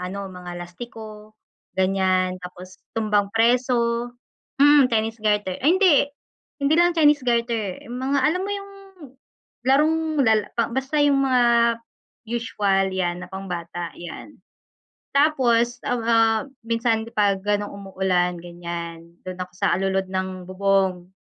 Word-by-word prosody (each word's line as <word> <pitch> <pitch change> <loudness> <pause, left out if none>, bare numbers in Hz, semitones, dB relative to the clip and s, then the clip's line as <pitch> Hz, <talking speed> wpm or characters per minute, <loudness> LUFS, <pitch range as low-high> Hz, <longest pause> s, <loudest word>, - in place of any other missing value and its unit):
ano, 195 +2 -5
mga 180 -1 -9
lastiko 215 +3 -10 0.4
ganiyan. 185 -1 +1
Tapos 180 +1 -10 0.2
tumbang 210 -2 +1
preso, 235 0 +2 0.5
mm, 285 -2 +6
Chinese 225 0 -1
garter, 205 -3 0
ay 280 - +3
hindi 375 -5 +5 0.7
hindi 280 +2 +3
lang 345 0 +4
Chinese 295 -3 +4
garter, 235 -5 -1
mga 260 +3 -1
alam 320 +7 +1
mo 400 - -4
'yung 400 0 -6 1.0
larong 295 +4 +4 0.3
lala 220 -2 +2 0.2
basta 265 +4 -1
'yung 285 -1 +3
mga 255 -2 +3 0.9
usual 200 -5 0
'yan 180 -1 -2
na - - -14
pambata 175 -3 -6
'yan. 175 - -9 0.8
Tapos, 245 -5 +3
a 245 - +1
ah, 225 -1 +2 0.2
minsan 230 -1 0
pag 200 -2 +2
gano'n 205 0 0
umuulan 190 -2 -1
ganiyan, 170 -1 -8
do'n 185 0 -7
ako 180 0 -5
sa - - +1
alulod 190 0 -1
ng 185 -1 -3
bubong. 190 -2 +1
210 Hz, 125 wpm, -23 LUFS, 185-245 Hz, 1.0 s, mm